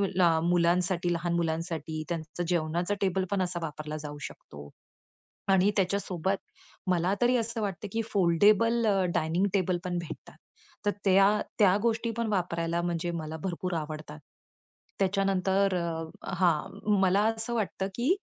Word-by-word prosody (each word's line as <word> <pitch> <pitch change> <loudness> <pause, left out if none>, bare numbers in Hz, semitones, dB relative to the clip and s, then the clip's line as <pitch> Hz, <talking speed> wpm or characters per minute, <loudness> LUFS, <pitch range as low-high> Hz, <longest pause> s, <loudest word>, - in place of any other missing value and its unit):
ल 185 - +2 0.3
मुलांसाठी, 175 0 +2
लहान 170 0 -1
मुलांसाठी 160 -1 -2
त्यांचं 170 +1 -4
जेवणाचा 170 +2 0
टेबल 190 -1 +1
पण 200 - +1
असा 180 -1 -1
वापरला 155 0 -5
जाऊ 145 0 -7
शकतो 70 0 -12 0.8
आणि 190 +1 +4
त्याच्यासोबत 190 -1 0 0.5
मला 180 +2 +2
तरी 245 +1 +4
असं 230 0 -2
वाटतं, 200 0 -3
की 225 - 0
फोल्डेबल 205 +5 +4
अ, 195 -3 +3
डायनिंग 165 +5 +1
टेबल 185 -2 +1
पण 180 -1 -1
भेटतात. 170 -2 -8 0.5
तर - - +5
त्या 195 0 +6 0.3
त्या 200 -3 +5
गोष्टी 230 0 +1
पण 235 0 0
वापरायला 170 -4 0
म्हणजे 175 0 -1
मला 155 0 -5
भरपूर 180 -1 -3
आवडतात. 155 - -6 0.8
त्याच्यानंतर, 195 0 +2 0.5
अ - - -6
हां, 185 +4 +1
मला 190 +1 +4
असं 225 +1 -1
वाटतं, 195 -3 -1
की 240 +5 -1
185 Hz, 140 wpm, -29 LUFS, 170-200 Hz, 0.8 s, त्या